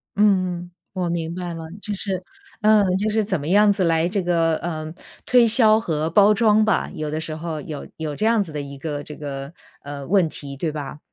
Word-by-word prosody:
嗯 185 -4 +2
嗯， 175 0 -12 0.2
我 180 -3 -2
明 165 -1 -2
白 175 -1 -5
了。 165 -1 -7 0.2
就 210 - -4
是 195 -2 -3 0.4
呃， 215 0 +5
就 210 +3 0
是 215 0 +1
怎 190 -4 -1
么 145 - -6
样 205 +4 +5
子 200 -2 0
来 165 -1 +2
这 195 +2 -1
个， 165 -2 +1
呃， 155 -2 -5 0.3
推 245 -2 +5
销 220 -1 +6
和 160 -7 -2
包 205 +4 +5
装 215 0 +4
吧， 215 - +1
有 155 -1 -4
的 155 +1 -3
时 160 -1 -3
候 160 -1 -5
有 150 -1 -7
有 155 -2 -4
这 215 - -1
样 225 -1 +3
子 170 - -10
的 150 -1 -4
一 140 0 -8
个 145 0 -4
这 150 - -9
个， 140 0 -6 0.3
呃， 140 -1 -7
问 185 -2 +3
题， 140 -2 -7
对 160 +3 -2
吧？ 150 -1 -6
170 Hz, 235 characters per minute, -22 LUFS, 155-205 Hz, 0.4 s, 销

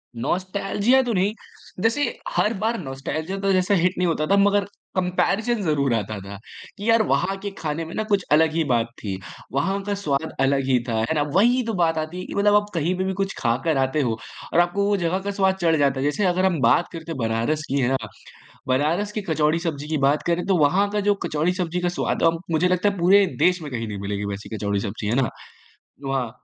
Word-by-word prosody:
Nostalgia 200 - +1
तो 240 -2 -1
नहीं। 195 +3 +1 0.5
जैसे, 230 +8 +1 0.3
हर 230 - +1
बार 230 +2 0
नॉस्टेल्जिया 155 +5 -4
तो 195 0 +1
जैसा 185 +2 +2
हिट 180 +1 +2
नहीं 180 -1 +1
होता 155 -2 0
था, 200 - +3
मगर 200 0 +3 0.3
कम्पैरिज़न 195 +5 0
ज़रूर 140 -6 +1
आता 110 -1 -2
था। 100 +1 -9 0.4
कि 205 +3 -3
यार 230 -1 +5
वहाँ 195 +1 +1
के 200 - -2
खाने 160 +1 -3
में 165 - -9
ना 215 - -1
कुछ 200 -3 +1
अलग 155 +1 +4
ही 165 -1 +1
बात 115 -1 +2 0.2
थी। 95 -2 -3 0.3
वहाँ 195 +8 0
का 205 0 -2
स्वाद 160 -5 -2
अलग 135 0 +2
ही 130 -2 +3
था, 115 - 0
है - - +2
ना? 150 - +2
वही 240 +6 +4
तो 225 - -2
बात 165 -3 +1
आती 155 +3 -3
है - - -6
कि - - -7
मतलब 205 +1 +4
आप 210 0 +4
कहीं 170 +2 0
पे 185 - 0
भी 190 0 -1
कुछ 195 0 -1
खा 115 -1 +2
कर 160 -4 +2
आते 135 +3 +1
हो 115 -4 -1 0.4
और 170 - +4
आपको 175 +3 +2
वो 205 0 +2
जगह 180 +1 0
का 200 +1 -3
स्वाद 190 -1 +2
चढ़ 165 -2 +3
जाता 140 -2 +2
है। - - -1
जैसे 150 +8 +1
अगर 185 +1 +2
हम 175 -5 +1
बात 120 +8 +4
करते 165 0 -7
हैं 160 - -4
बनारस 115 +7 0
की, 140 +1 +1
है 120 - +2
ना? 135 - +2 0.7
बनारस 155 +11 +1
की 210 0 -3
कचौड़ी-सब्ज़ी 155 -1 0
की 155 - -1
बात 145 +2 +1
करें 170 +1 0
तो 190 -3 +3
वहाँ 185 +7 +3
का 210 - 0
जो 205 - +4
कचौड़ी-सब्ज़ी 175 +3 -1
का 175 - +1
स्वाद - - -1
अ, 165 - +6 0.2
मुझे 160 +3 +3
लगता 185 +3 +2
है 200 - -5
पूरे 195 +3 +5
देश 180 -1 +3
में 150 -3 -7
कहीं 115 -2 -3
नहीं 105 - -5
मिलेगी 100 +1 -3
वैसी 100 - -11
कचौड़ी-सब्ज़ी, 100 0 -2
है 115 - +1
ना? 120 - 0 0.8
वहाँ 130 -4 -1
170 Hz, 230 wpm, -23 LUFS, 140-195 Hz, 0.8 s, अ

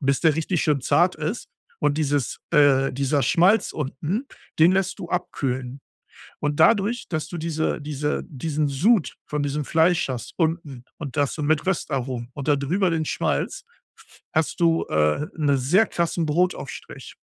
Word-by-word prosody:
bis 140 -1 +1
der 160 -3 +3
richtig 165 +1 0
schön 150 -3 +1
zart 175 +7 +2
ist. 160 +9 -4 0.3
Und 150 0 +1
dieses 145 -4 0
äh, 135 -2 +4
dieser 140 +2 0
Schmalz 180 - +3
unten, 155 - -3 0.3
den 165 +3 +7
lässt 190 +1 0
du 175 - -6
abkühlen. 130 -6 -3 0.6
Und 145 +1 -1
dadurch, 220 +6 +3
dass 155 -3 -3
du 175 - -6
diese 160 -1 -1
diese 150 0 -2
diesen 150 +1 -2
Sud 175 - +2
von 150 -1 -2
diesem 145 +1 -2
Fleisch 165 0 +2
hast 125 -2 -5
unten 160 -6 -2
und 145 -5 -7
das 145 -2 +1
so 155 - -5
mit 155 +3 +1
Röstaromen 130 -9 -2
und 145 0 -6
da 145 - +4
drüber 175 +8 0
den 160 -1 0
Schmalz, - - -2 0.5
f - - -20
hast 160 +3 0
du, 165 -1 +3
äh, 75 - +1
'ne 145 -3 +2
sehr 165 - +3
krassen 170 -1 -1
Brotaufstrich. 180 +5 -3
150 Hz, 165 wpm, -23 LUFS, 140-170 Hz, 0.6 s, den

